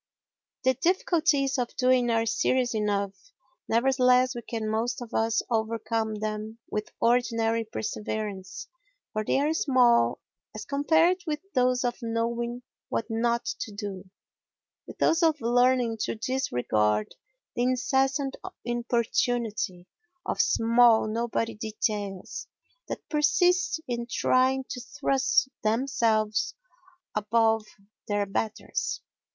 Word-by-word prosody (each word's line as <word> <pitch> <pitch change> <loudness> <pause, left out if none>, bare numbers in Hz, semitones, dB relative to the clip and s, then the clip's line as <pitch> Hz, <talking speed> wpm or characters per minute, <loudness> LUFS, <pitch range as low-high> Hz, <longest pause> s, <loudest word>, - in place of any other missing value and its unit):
The 260 0 +4
difficulties 300 -3 +1
of 245 -1 -3
doing 255 -1 +3
are 225 -1 +2
serious 250 +2 +1
enough, 205 -2 0 0.5
nevertheless 250 +1 +3
we 240 - -6
can 225 -1 -4
most 225 +3 -1
of 240 -2 -9
us 225 0 +1
overcome 225 0 -1
them 215 +1 -4
with 210 0 -3
ordinary 230 -1 +2
perseverance 210 -3 -5 0.5
for 215 -1 -1
they 240 - +1
are 295 +3 +1
small 240 - +3 0.4
as 215 - -6
compared 320 +5 +3
with 300 -1 -1
those 250 -1 +2
of 245 -1 -1
knowing 235 +1 -2 0.3
what 230 - -2
not 235 +1 0
to 220 - -4
do—with 200 -2 -11
those 325 +2 +3
of 320 -2 +3
learning 245 -1 +2
to - - -2
disregard 120 - 0 0.4
the - - -1
incessant 265 +2 +1 0.3
importunity 235 -5 -1 0.4
of - - +1
small 230 0 +4
nobody 230 +1 -1
details 210 -3 -4 0.4
that - - -6
persist 355 +4 +2
in 235 -1 -3
trying 260 +2 +2
to 250 - -5
thrust 270 0 +1
themselves 220 -2 +1 0.6
above 220 +1 +2 0.4
their 205 -1 0
betters. 220 - -3
235 Hz, 110 wpm, -27 LUFS, 215-255 Hz, 0.6 s, The